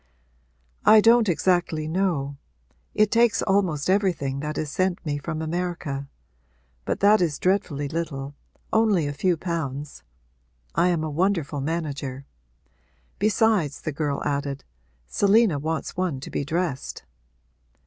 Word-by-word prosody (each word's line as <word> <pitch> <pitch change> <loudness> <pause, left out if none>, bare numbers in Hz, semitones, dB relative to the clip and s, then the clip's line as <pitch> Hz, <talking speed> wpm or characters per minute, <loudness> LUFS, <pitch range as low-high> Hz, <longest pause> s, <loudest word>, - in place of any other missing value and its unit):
'I 215 0 +7
don't 230 -1 +5
exactly 170 -2 +1
know: 160 -5 -1 0.6
it 215 -1 +3
takes 235 -1 +3
almost 190 -7 +1
everything 180 -9 +1
that 150 +1 -4
is 150 -2 -3
sent 185 +1 -1
me 145 -1 -2
from 160 +2 -4
America. 160 -4 -3 0.8
But - - -2
that 210 +1 +5
is 160 -5 0
dreadfully 175 -7 0
little 145 -3 -4 0.4
only 215 -7 +3
a 145 - -2
few 175 +4 +1
pounds. 150 -4 -4 0.7
I 170 +2 +3
am 170 -3 +1
a 155 - -3
wonderful 165 -4 0
manager. 140 -3 -3 0.9
Besides,' 210 - +2
the 155 - -3
girl 145 -1 -2
added, 140 -1 -2 0.4
'Selina 200 - +3
wants 160 +2 -3
one 180 -7 -1
to - - -8
be - - -1
dressed.' 160 -2 -3
160 Hz, 130 wpm, -24 LUFS, 145-190 Hz, 0.9 s, I